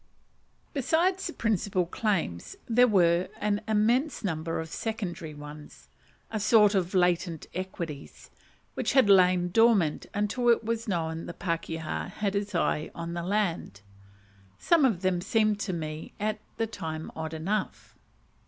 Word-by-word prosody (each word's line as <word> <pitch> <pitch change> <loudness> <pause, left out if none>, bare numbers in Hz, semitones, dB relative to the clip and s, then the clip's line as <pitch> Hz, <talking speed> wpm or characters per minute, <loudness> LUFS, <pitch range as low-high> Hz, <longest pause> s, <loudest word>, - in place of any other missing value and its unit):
Besides 340 +8 +1
the 340 - -6
principal 200 -4 0
claims 170 - -2
there 245 +2 +5
were 175 -4 +3
an 210 0 0
immense 230 +8 +1
number 165 -3 -2
of 160 - -4
secondary 175 -8 -4
ones 150 0 -11 0.4
a 215 - -2
sort 210 0 +5
of 185 -1 0
latent 175 -2 +1
equities 170 -6 -6 0.4
which - - -1
had 260 -7 +5
lain 180 -2 +5
dormant 210 -6 +3
until 215 +4 +1
it 230 -1 +4
was 230 +1 -2
known 165 -4 -2
the 170 - -7
pakeha 165 -2 -3
had 200 -2 -2
his 200 -1 -2
eye 155 -2 0
on 170 0 -5
the 170 - -3
land. 175 - -1 0.8
Some 330 -5 +4
of 205 -8 +1
them 185 -2 +1
seemed 215 +1 +1
to 200 - -2
me 155 -2 -5
at 215 +1 -1 0.2
the 225 - +1
time 160 -7 -6
odd 160 0 -4
enough. 195 +7 -3
190 Hz, 145 wpm, -28 LUFS, 165-215 Hz, 0.8 s, there